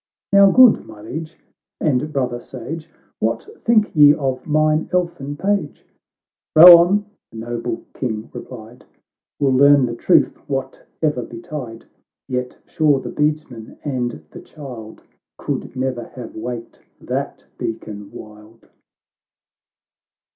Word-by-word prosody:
" - - -30
Now, 200 0 +7
good 255 +2 +6
my 110 -1 -12
Liege, 160 +7 -7 0.4
and 150 0 0
brother 125 -4 -2
sage, 160 +6 -8 0.3
"What - - -2 0.2
think 220 -5 +2
ye 145 -1 +7
of 135 -4 -3
mine 155 +1 +1
elfin 170 -6 -2
page 195 -4 -2 0.2
?"— - - -71
" - - -73
Bow 175 +2 +12
on 200 +4 +2
!" - - -70
the 115 - -11
noble 120 0 -4
King 110 -4 -4
replied, 120 0 -11 0.3
" - - -72
We'll 140 -2 +2
learn 140 0 +6
the 120 - -4
truth 115 - +3 0.2
wbate'er 135 +1 -3
betide; 115 -2 -8 0.5
Tet 125 0 -3
sure 155 -5 +2
the - - -7
beadsman 150 -7 -3
and 120 - -3
the - - -10
child 125 -8 -11 0.3
Could - - -5
ne'er 130 -2 -3
have 125 -3 -9
waked 115 +1 -7 0.2
that - - -5
beacon 105 -2 -6
wild." 105 +1 -14
135 Hz, 135 wpm, -20 LUFS, 120-155 Hz, 0.5 s, Bow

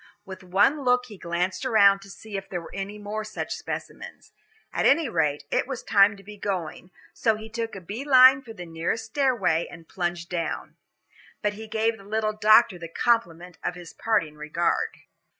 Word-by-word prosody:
With 190 -1 -9
one 205 +11 +2
look 250 0 +3
he 210 - -10
glanced 175 +4 -2
around 200 -6 +5
to 195 - -13
see 210 +1 -10
if 195 0 -5
there 180 - -3
were 170 - -12
any 195 +2 -5
more 210 +1 -4
such 215 - -5
specimens. - - -7 0.4
At - - +2
any 300 +2 +4
rate, 150 -7 0
it - - +1
was 265 -3 -5
time 200 0 +4
to 195 - -15
be 210 +1 -11
going, 185 -3 -4 0.2
so 225 -1 +1
he 220 +1 -8
took 225 0 -4
a 195 - -7
bee 205 +9 -6
line 265 -1 +7
for 245 -4 -11
the 180 -5 -8
nearest 165 +7 -3
stairway 225 - +1
and 165 -2 -13
plunged 175 -1 -3
down. 170 -2 -4 0.7
But 210 0 +1
he 220 +1 -9
gave 220 +1 0
the - - -13
little 215 +1 -1
doctor 215 -2 +5
the 170 - -6
compliment 175 -4 -1
of 180 - -2
his 175 -1 -11
parting 190 -9 0
regard. 150 +3 -1
205 Hz, 190 wpm, -25 LUFS, 175-225 Hz, 0.7 s, line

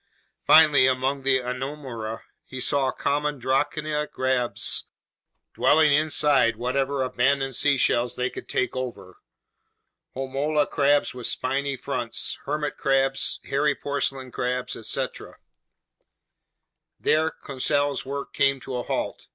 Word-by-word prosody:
Finally, 150 -5 +6
among 130 +2 0
the 135 0 +3
Anomura, 125 -3 -5 0.2
he 130 - -7
saw 135 0 +1
common 145 0 -1
drocina 150 +4 -1
crabs 130 -2 -1 0.7
dwelling 155 -2 +4
inside 145 -5 +3
whatever 130 +3 -1
abandoned 135 +1 +1
seashells 125 -4 +2
they 125 - 0
could - - -9
take 130 - -1
over, 110 -8 -6 1.0
homola 140 +3 0
crabs 145 0 +2
with 125 -2 -4
spiny 135 +1 -1
fronts, 125 -2 -2
hermit 150 0 -2
crabs, 135 0 +1
hairy 145 +1 +1
porcelain 135 -2 -3
crabs, 125 +1 -2
etc. 130 +4 -4 1.6
There 160 +1 +2
Conseil's 145 0 -1
work 140 +1 -6
came 140 0 +2
to 130 0 -5
a - - -2
halt. - - -4
135 Hz, 110 wpm, -25 LUFS, 130-145 Hz, 1.6 s, Finally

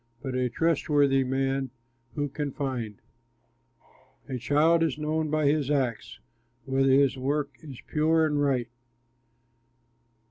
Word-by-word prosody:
But 130 -2 -4
a 125 -1 0
trustworthy 145 -2 +2
man 135 +1 -1 0.5
who 145 -2 -1
can 145 +1 -4
find? 125 -7 -3 1.3
A 130 -3 -4
child 150 +6 +3
is 160 -4 0
known 155 +1 -1
by 155 0 +1
his 145 -1 +2
acts, 130 -6 -1 0.5
Whether 135 0 +2
his 135 -1 +3
work 140 +2 -1
is 140 -6 -10
pure 160 +1 +2
and 150 -2 0
right. 130 -4 0
140 Hz, 120 wpm, -27 LUFS, 130-150 Hz, 1.3 s, child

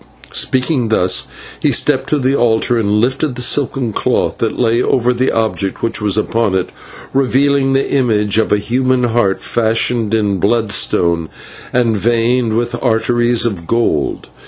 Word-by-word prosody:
Speaking 130 -1 0
thus, 90 -4 +1 0.3
he - - +1
stepped - - 0
to 150 - +1
the 135 0 +1
altar 120 -1 +1
and 105 -2 0
lifted 130 +4 -1
the 125 - -2
silken 130 -3 0
cloth - - -1
that - - -2
lay 120 0 +2
over 125 0 +1
the 130 +2 0
object 110 -3 -2
which 115 -1 -1
was 105 -1 0
upon 110 -2 0
it, 95 -1 -2 0.4
revealing 135 +1 +2
the 135 0 +1
image 110 -6 +1
of 110 - 0
a 105 - +4
human 125 +4 0
heart 115 -5 0
fashioned 115 -1 0
in 100 -3 0
bloodstone 95 -6 +1 0.4
and 120 -3 +1
veined 115 +1 +1
with 120 0 -2
arteries 120 0 +1
of 95 -8 -3
gold. 115 -11 -1
115 Hz, 155 wpm, -15 LUFS, 105-125 Hz, 0.4 s, a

